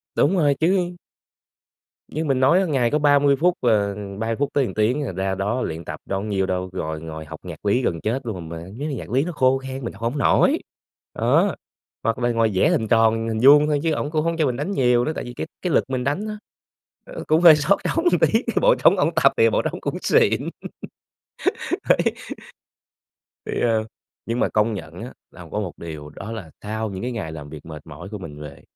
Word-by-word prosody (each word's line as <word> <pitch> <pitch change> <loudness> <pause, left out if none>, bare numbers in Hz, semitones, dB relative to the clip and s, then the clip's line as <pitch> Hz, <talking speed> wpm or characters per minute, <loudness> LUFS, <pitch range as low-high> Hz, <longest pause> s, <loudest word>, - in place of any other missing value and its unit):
Đúng 185 +6 +3
rồi 145 -4 +3
chứ. 180 +1 +1 1.1
Như 155 +2 -3
mình 135 -3 +1
nói 135 +8 +5
á 190 - +1
ngày 135 -8 +1
có 150 - +2
30 145 -1 +4
phút, 175 +5 +2
à, 105 -4 +2 0.3
30 115 +1 -1
phút 140 +3 -1
tới 140 -2 +2
1 - - -5
tiếng 120 +7 +1
à, 130 - -3
ra 95 +1 -2
đó 105 +6 -1
luyện 80 -4 -4
tập - - -6
đâu 95 - -2
có - - -5
nhiêu 100 -3 0
đâu, 95 0 -2
rồi 80 -4 -4
ngồi 80 -1 -7
học - - -9
nhạc - - -9
lý 105 +5 +2
gần 85 -9 -1
chết 125 +5 -2
luôn, 90 -8 -5
mà 85 - -6
mấy 95 +5 -11
cái 145 - -3
nhạc - - -7
lý 130 +5 +2
nó 175 - -3
khô 130 -4 +3
khan 135 0 -7
mình 115 - -4
học 100 - -15
hổng 120 +5 -1
nổi. 140 - +3 0.6
Đó, - - +2 0.5
hoặc 115 +1 0
là 120 0 +1
ngồi 115 -1 +2
vẽ 95 - +3
hình 110 - +1
tròn 115 0 +3
hình 110 -1 -2
vuông 145 +2 +7
thôi, 150 -1 +1
chứ 165 - +1
ổng 150 -1 -2
cũng 155 -1 0
hổng 165 0 0
cho 155 - +2
mình 125 -3 0
đánh 150 +8 -3
nhiều 125 -7 +2
nữa, 155 - -1
tại - - -4
vì 120 - -8
cái 140 - -5
cái 180 - -1
lực - - +4
mình 130 -1 -2
đánh 145 +11 -1
á, 215 0 -5 0.7
ờ, - - -8
cũng 155 +2 +3
hơi 170 -3 +9
xót 150 +7 +2
trống 330 - -1
một - - +4
tí, 225 - +4 0.2
bộ - - +5
trống 195 - +4
ổng 160 -2 +2
tập 135 -4 +5
thì 115 0 +5
bộ - - +1
trống - - -4
cũng - - -3
xịn. - - +2 1.4
Đấy, - - +5 1.5
thì, - - -2
ờ, 115 -2 +2 0.4
nhưng 115 +2 -2
mà - - +2
công 110 +1 +1
nhận 85 -2 -8
á 125 - -7 0.2
là 90 - -12
có 105 - -1
một 95 -5 -4
điều 80 -3 -8
đó 100 +8 -8
là, 100 -8 -7
sau 110 +1 -3
những 95 -1 -6
cái 125 +1 -3
ngày 95 -9 -5
làm 75 -2 -8
việc 75 -1 -10
mệt 75 -2 -10
mỏi 90 +6 -10
của 105 0 -6
mình 75 -6 -9
về, 75 -2 -10
120 Hz, 240 wpm, -22 LUFS, 95-145 Hz, 1.5 s, hơi